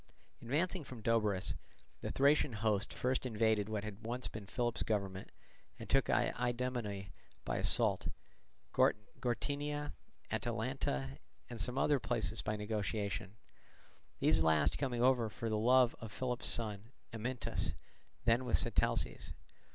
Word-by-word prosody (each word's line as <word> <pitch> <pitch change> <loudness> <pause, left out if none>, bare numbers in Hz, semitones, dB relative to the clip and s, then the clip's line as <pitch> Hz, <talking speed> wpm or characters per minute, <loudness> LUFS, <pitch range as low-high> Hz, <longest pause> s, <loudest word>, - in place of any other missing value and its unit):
Advancing 165 +8 0
from 130 -3 -9
Doberus, 105 -4 +2 0.5
the - - -3
Thracian 140 -1 +4
host 105 -2 +1
first 130 +1 0
invaded 110 -3 +1
what 105 -2 -2
had 105 0 -7
been 115 - -6
once 125 +1 -1 0.2
Philip's 120 +1 -1
government, 100 -3 -1 0.5
and - - -8
took - - +3
Idomene 120 -6 0 0.3
by - - -1
assault, - - +2 0.7
Gortynia, 145 +7 0 0.4
Atalanta, 65 0 -2 0.3
and 115 -2 -3
some 125 +1 -1
other 145 0 +3
places 110 -3 0
by 105 - -1
negotiation, 105 -1 -2 0.8
these 80 - +4
last 80 -1 +3
coming 120 -3 0
over 125 -3 +4
for 110 +2 -4
love 120 +3 +4
of 115 -2 -7
Philip's 125 +2 -1
son, 110 -1 0 0.2
Amyntas, 120 +3 -2 0.5
then 115 +2 +4
with 125 - +2
Sitalces. - - +1
115 Hz, 120 wpm, -35 LUFS, 105-125 Hz, 0.8 s, Thracian